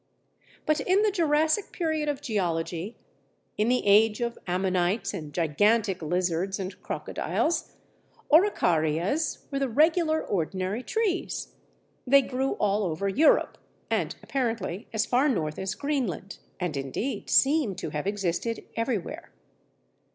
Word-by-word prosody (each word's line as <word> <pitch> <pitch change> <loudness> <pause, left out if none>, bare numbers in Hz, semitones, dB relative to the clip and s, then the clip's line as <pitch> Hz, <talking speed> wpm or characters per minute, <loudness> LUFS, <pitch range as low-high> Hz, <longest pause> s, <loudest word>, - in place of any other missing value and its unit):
But 305 0 +2
in 370 +8 +2
the 425 - +3
Jurassic 320 +1 +1
period 315 -3 -1
of 285 -2 -3
geology, 180 -1 -2 0.6
in 215 +2 +1
the 250 0 +1
age 210 +2 +5
of 235 -1 -3
ammonites 185 +3 0
and 155 -6 -6
gigantic 190 +5 +2
lizards 180 +3 -1
and 185 -1 -6
crocodiles, 185 - -2 0.6
Araucarias 185 - +2
were 275 - -1
the 275 -1 0
regular, 315 +4 +3
ordinary 190 +4 -2
trees. 415 - -2 0.5
They 275 +2 +6
grew 265 +1 -1
all 210 0 +1
over 175 +2 -2
Europe, 285 +11 +3 0.3
and - - 0
apparently 225 -7 -2
as 220 0 0
far 260 +5 +2
north 155 - -1
as 190 +1 -3
Greenland, 235 - -3 0.2
and, 180 -5 -2
indeed, 140 - -3
seem 275 -7 +3
to - - -5
have 150 +5 -3
existed 200 +3 -2
everywhere. 230 -5 -3
215 Hz, 125 wpm, -27 LUFS, 180-280 Hz, 0.6 s, They